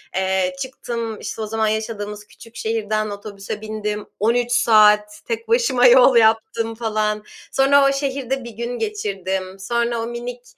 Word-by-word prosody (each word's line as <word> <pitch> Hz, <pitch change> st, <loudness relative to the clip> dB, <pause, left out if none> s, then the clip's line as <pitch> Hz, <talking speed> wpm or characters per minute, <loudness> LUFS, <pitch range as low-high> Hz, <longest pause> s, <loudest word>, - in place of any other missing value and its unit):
eee, 190 Hz, +3 st, 0 dB
çıktım, 235 Hz, -4 st, -5 dB
işte, -, -, -6 dB
o 215 Hz, -, -3 dB
zaman 220 Hz, 0 st, 0 dB
yaşadığımız 210 Hz, -1 st, -4 dB
küçük 230 Hz, -1 st, -16 dB
şehirden 220 Hz, -1 st, -1 dB
otobüse 205 Hz, 0 st, -7 dB
bindim, 210 Hz, -1 st, -4 dB
13 240 Hz, +3 st, +1 dB
saat 210 Hz, -3 st, +4 dB
tek 460 Hz, -1 st, -4 dB
başıma 455 Hz, -, +3 dB
yol 250 Hz, +1 st, +7 dB
yaptım 225 Hz, 0 st, +2 dB
falan. 215 Hz, -2 st, -1 dB, 0.3 s
Sonra 275 Hz, +1 st, +4 dB
o -, -, +2 dB
şehirde 270 Hz, -2 st, -2 dB
1 235 Hz, -, -7 dB
gün 235 Hz, +2 st, -5 dB
geçirdim. 190 Hz, -, -3 dB
Sonra 235 Hz, +3 st, -1 dB
o 225 Hz, -, -3 dB
minik, 240 Hz, +1 st, -6 dB
225 Hz, 145 wpm, -21 LUFS, 210-245 Hz, 0.3 s, yol